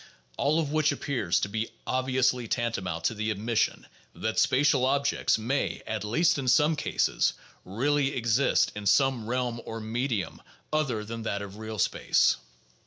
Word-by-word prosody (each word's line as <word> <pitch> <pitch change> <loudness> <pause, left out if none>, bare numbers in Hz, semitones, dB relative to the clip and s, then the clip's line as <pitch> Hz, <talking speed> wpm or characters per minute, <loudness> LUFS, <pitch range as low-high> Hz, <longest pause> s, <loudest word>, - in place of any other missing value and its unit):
All 150 - +1
of 150 -3 -2
which 155 -1 +2
appears 120 - -1
to - - 0
be 110 +2 -3 0.2
obviously 130 -1 +1
tantamount 95 -9 -2
to 115 - +1
the 110 0 -2
admission 110 +2 -1 0.3
that 110 0 -1
spatial 135 0 +3
objects 140 -1 +2
may 120 +6 -2
at 110 -1 -3
least 160 +10 +2
in 130 - -4
some 150 +5 +4
cases - - +1 0.3
really 140 +7 0
exist 115 +2 +2
in 105 -1 -4
some 125 +1 +3
realm 120 -1 -2
or 115 - -6
medium 115 -1 -3 0.3
other 130 -9 0
than 115 +1 -6
that 100 -2 -3
of 100 0 -9
real 110 0 -6
space. - - +2
120 Hz, 155 wpm, -27 LUFS, 110-140 Hz, 0.3 s, some